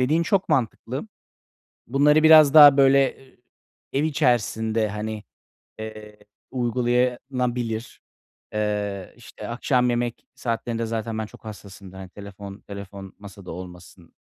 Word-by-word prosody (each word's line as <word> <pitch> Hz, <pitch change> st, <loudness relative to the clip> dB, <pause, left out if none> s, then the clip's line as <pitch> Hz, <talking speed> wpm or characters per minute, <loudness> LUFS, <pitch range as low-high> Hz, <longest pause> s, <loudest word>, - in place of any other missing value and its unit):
dediğin 155 Hz, +6 st, +2 dB
çok 190 Hz, +2 st, 0 dB
mantıklı. 130 Hz, -, -2 dB, 0.8 s
Bunları 150 Hz, +4 st, +3 dB
biraz 155 Hz, -3 st, +8 dB
daha, 145 Hz, -3 st, +9 dB
böyle, 135 Hz, 0 st, +4 dB
eee, -, -, -26 dB, 0.6 s
ev 140 Hz, -, +1 dB
içerisinde, 110 Hz, -6 st, +1 dB
hani, 105 Hz, 0 st, -5 dB, 0.6 s
eee, 110 Hz, -1 st, -9 dB, 0.3 s
uygulanabilir. 125 Hz, -1 st, -1 dB, 0.5 s
Eee, 105 Hz, -2 st, -3 dB
işte, -, -, -11 dB
akşam 125 Hz, +1 st, +1 dB
yemek 120 Hz, -1 st, -3 dB
saatlerinde 115 Hz, -1 st, -3 dB
zaten 110 Hz, 0 st, -4 dB
ben 110 Hz, -, -2 dB
çok 110 Hz, -, -16 dB
hassasımdır. 100 Hz, -3 st, -11 dB
Hani, 95 Hz, -1 st, -9 dB
telefon 100 Hz, 0 st, -10 dB
telefon 100 Hz, -1 st, -9 dB
masada 100 Hz, -2 st, -11 dB
olmasın. 90 Hz, 0 st, -11 dB
115 Hz, 115 wpm, -23 LUFS, 105-130 Hz, 0.8 s, daha